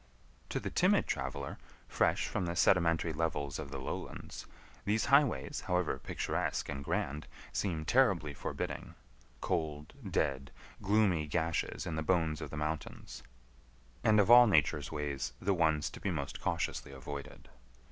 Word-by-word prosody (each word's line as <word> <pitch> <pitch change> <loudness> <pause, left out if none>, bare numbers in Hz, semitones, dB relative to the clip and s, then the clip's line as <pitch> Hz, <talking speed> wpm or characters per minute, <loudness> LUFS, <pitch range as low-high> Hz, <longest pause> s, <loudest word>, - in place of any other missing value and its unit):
To - - -1
the - - -4
timid - - +3
traveler, 65 +1 -3 0.3
fresh - - +1
from 90 - -2
the 85 - -2
sedimentary 85 -2 +3
levels 75 -3 -2
of 75 -3 -6
the 70 - -5
lowlands, 65 - -6 0.4
these 105 +2 +1
highways, 140 - +2
however 90 -6 +1
picturesque - - -2
and 70 0 -4
grand, 75 +1 -2 0.3
seem 80 -6 -1
terribly 95 - +3
forbidding—cold, 75 +2 -5 0.2
dead, 70 0 0 0.3
gloomy 95 -6 +2
gashes 80 +1 -1
in 80 -3 -3
the - - 0
bones 80 -3 +1
of - - -5
the 80 - -6
mountains, 75 +1 -4 0.8
and 105 -1 +5
of 105 +3 +5
all 120 0 +10
Nature's 75 -5 +2
ways 75 -3 -3
the 100 +2 +1
ones 80 -5 +2
to - - -9
be - - -2
most 75 -6 -4
cautiously - - -2
avoided. 70 +1 -8
80 Hz, 140 wpm, -33 LUFS, 70-90 Hz, 0.8 s, all